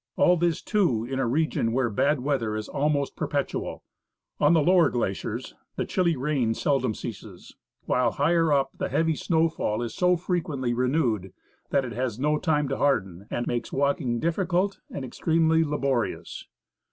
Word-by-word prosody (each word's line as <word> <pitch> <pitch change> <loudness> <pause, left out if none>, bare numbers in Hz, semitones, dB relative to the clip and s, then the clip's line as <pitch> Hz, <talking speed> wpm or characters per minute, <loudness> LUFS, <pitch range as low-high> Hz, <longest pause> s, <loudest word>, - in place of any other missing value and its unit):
All 180 - +5
this, 170 -2 0
too, 170 - +1
in 135 +2 -3
a 130 - +1
region 125 -4 0
where 125 -2 +1
bad 140 +6 +1
weather 125 -6 -1
is 110 -1 -4
almost 140 -1 0
perpetual. 145 -3 -3 0.6
On 150 +3 +5
the 160 -3 +4
lower 180 +1 +5
glaciers 105 -6 -3 0.2
the - - -2
chilly 170 -3 +1
rain 130 -4 0
seldom 130 -6 0
ceases, - - -9 0.3
while, 125 -1 +2
higher 165 +2 +2
up, 135 -1 +2
the - - -3
heavy 160 0 +1
snowfall 160 -9 0
is 120 - -5
so 180 0 +2
frequently 155 -8 -2
renewed 120 - 0 0.4
that 135 -2 +1
it 120 - -6
has 125 -1 -2
no 150 +3 +1
time 150 -4 +1
to 135 - -1
harden, 95 -9 0
and 120 - -2
makes 120 -1 -3
walk 140 +4 +1
ing, 120 -4 -1
difficult 180 - 0
and 135 - -5
extremely 160 +4 +2
laborious. 140 -5 -2
140 Hz, 165 wpm, -26 LUFS, 120-160 Hz, 0.6 s, All